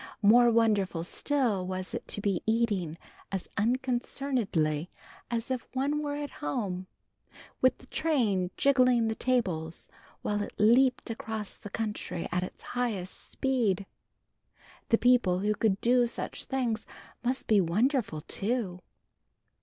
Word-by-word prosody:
More 240 +4 +7
wonderful 210 -7 +2
still 220 -2 0
was 185 0 -4
it - - -5
to 205 - -2
be 195 -4 0
eating 205 -8 +1 0.3
as 195 -2 -3
unconcernedly 240 - 0 0.4
as 235 +1 -2
if 255 -2 -2
one 285 +3 +1
were 290 -1 -2
at 290 0 -4
home, 185 +4 -2 0.7
with 255 - +4
the - - -16
train 230 - +1
jiggling 250 -4 +4
the - - 0
tables 185 -11 -1 0.3
while 205 0 0
it - - -5
leaped 245 +3 +4
across 220 -2 -4
the 205 - -10
country 210 -5 -3
at 180 - +1
its 185 - -7
highest 220 -7 -2 0.2
speed. 230 -8 0 1.0
The 230 - +5
people 245 -8 +4
who 210 +1 +2
could 205 -2 +1
do 245 0 +4
such - - -4
things 245 -5 -1 0.4
must 255 +2 -1
be 210 -3 +4
wonderful 210 - +1
too. 195 0 -2
225 Hz, 130 wpm, -29 LUFS, 190-250 Hz, 1.0 s, More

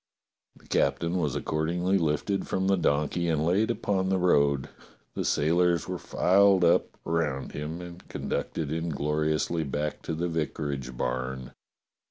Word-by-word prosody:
The - - -21
captain 85 +2 +1
was 75 -6 -1
accordingly 85 +5 0
lifted 80 +5 0
from 95 0 -1
the 95 0 +4
donkey 80 +1 0
and 80 -2 +1
laid 100 +7 +2
upon 95 -5 0
the 95 - +2
road. 70 -7 +3 0.5
The - - -2
sailors 85 +1 +2
were - - -4
filed 95 0 +4
up 85 - +2
around 80 -5 -1
him, 80 +4 -5
and 90 0 -10
conducted 75 -3 -3
ingloriously 80 0 0
back 75 +1 -3
to 80 - -4
the 85 +2 -1
vicarage 70 -6 -3
barn. 65 +1 -3
80 Hz, 140 wpm, -27 LUFS, 75-90 Hz, 0.5 s, the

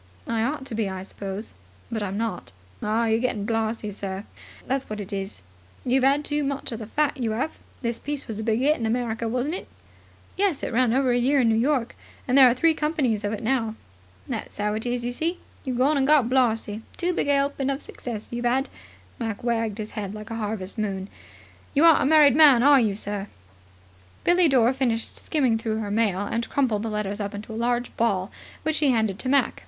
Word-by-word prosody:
"I 230 -1 -1
ought 270 +2 -2
to 270 - -8
be, 220 -2 -1
I 190 -1 -5
suppose. 200 +2 -6 0.4
But 220 -2 -2
I'm 200 -1 -3
not." 225 -4 -3 0.3
"Ah, 220 +2 +1
you're 225 0 +2
getting 230 -4 -1
blarzy, 225 -1 -1
sir, 195 0 -5 0.4
that's 270 +1 -2
what 215 0 -4
it 205 +1 -5
is. 195 - -5 0.4
You've 255 +1 +2
'ad 280 +2 +3
too 295 0 0
much 275 -1 -3
of 230 - -5
the 220 - -7
fat, 300 +4 0
you 225 -4 -1
'ave. 265 +7 -2 0.3
This 235 0 -1
piece 290 0 -4
was 220 -2 -5
a - - -3
big 225 +2 +1
'it 300 +2 +4
in 225 - -1
America, 230 -1 -1
wasn't 255 +6 -1
it?" 370 - -5 0.7
"Yes. 385 -7 0
It - - -3
ran 245 0 +3
over 260 +1 +2
a 245 - +2
year 275 +4 +3
in 235 - +3
New - - +3
York, 250 +1 +1 0.3
and 250 - +2
there 265 -2 +9
are - - +3
three 325 +5 +4
companies 300 -9 0
of 205 - -1
it 215 - -4
out - - -10
now." 225 -3 0 0.5
"That's - - -5
'ow 210 0 0
it 220 +3 -3
is, 240 0 -1
you 245 - -2
see. 330 +7 -1 0.3
You've 255 -2 -2
gone 280 +4 +3
and 270 - +2
got 295 -5 +5
blarzy. 225 -4 +1 0.2
Too 360 +1 0
big - - -1
a 285 - +4
'elping 275 -1 0
of 275 +1 -4
success, 225 -4 -6
you've 240 0 -3
'ad." 265 +3 +1 0.5
Mac 225 -3 -4
wagged 225 -3 -1
a 215 - -2
head 210 -1 -6
like 215 +1 -8
a - - -3
harvest 210 0 -2
moon. 195 -2 -2 0.7
"You 290 - +4
aren't 330 -3 +7
a - - +2
married 295 -2 +6
man, 285 -6 +7
are 285 0 +7
you, 210 -4 +1
sir?" 205 -1 -4 1.0
Billie 350 0 +4
Dore 255 -3 +4
finished 240 -4 -1
skimming 255 -7 +1
through 220 -1 -2
her 210 -2 -3
mail, 205 -3 +1
and 230 +3 -2
crumpled 245 -7 +1
the 225 - -3
letters 210 -1 -3
up 205 0 -3
into 215 +2 -7
a 230 +2 -1
large 245 0 -1
ball, 200 -4 +1 0.3
which 315 0 0
she 295 - +3
handed 220 -6 +1
to 255 - -3
Mac. 280 +1 +2
235 Hz, 225 wpm, -25 LUFS, 215-270 Hz, 1.0 s, there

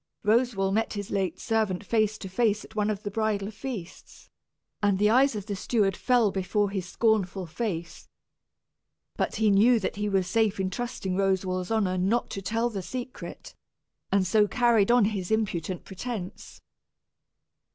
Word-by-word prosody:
Roswal 215 -3 +2
met 225 +2 0
his 205 -2 -5
late 190 -3 -1
servant 215 -4 -1
face 215 -1 +1
to 195 - -7
face 210 +2 +1
at 220 - -17
one 210 0 +1
of 210 -1 -3
the 205 - -4
bridal 210 -1 -1
feasts, 220 -5 -8 0.5
and 205 -2 +2
the 210 +2 +3
eyes 260 +1 +4
of 205 -2 -5
the 205 -2 -3
steward 200 0 +1
fell 245 -5 +2
before 200 +2 0
his 190 -3 -3
scornful 200 -5 +1
gaze. 170 -1 -5 1.1
But - - -1
he 220 -2 +3
knew 225 +4 +5
that 200 - -3
he 210 0 -1
was 195 -2 +1
safe 220 +1 +1
in 190 -1 -1
trusting 215 -5 -3
Roswal's 185 -2 0
honor 200 -5 +1
not 210 +7 0
to 195 - -4
tell 230 +5 -1
the 200 -3 -4
secret, 250 +8 -7 0.6
and 195 -1 +3
so 210 +3 +3
carried 235 -3 +3
on 240 -3 +5
his 200 -4 -2
impudent 190 -5 -1
pretence. 195 -1 -7
205 Hz, 160 wpm, -27 LUFS, 190-225 Hz, 1.1 s, knew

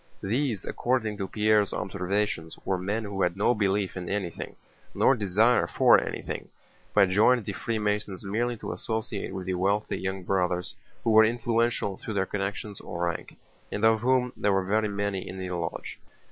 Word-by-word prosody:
These 115 0 -1
according 115 -4 -1
to 100 -2 -3
Pierre's 105 0 +2
observations 95 -3 -2
were 95 -1 0
men 105 +5 -2
who 100 -2 -4
had 90 0 +1
no 105 +4 +3
belief 100 -2 0
in 90 -2 -5
anything, 95 -4 -3 0.4
nor - - +5
desire 110 +2 +3
for - - +5
anything, - - -5 0.4
but 95 - +5
joined 110 +4 +4
the 100 - -3
Freemasons 105 -3 -2
merely 120 +4 -1
to - - -5
associate 110 -3 -3
with 95 -1 -5
the 95 - -1
wealthy 100 +4 0
young 95 0 -3
Brothers 90 -1 0 0.3
who 115 - +2
were 110 0 +8
influential 115 -3 +1
through 110 - -6
their 95 -1 +2
connections 100 +1 -4
or 85 - -4
rank, 85 - -6 0.3
and 105 - 0
of 110 -1 +4
whom 125 0 +2
there 105 - +1
were 95 -1 +1
very 105 +3 +2
many 100 -1 -2
in 95 - -7
the 95 -1 -4
lodge. 85 -2 -4
100 Hz, 175 wpm, -27 LUFS, 95-110 Hz, 0.4 s, were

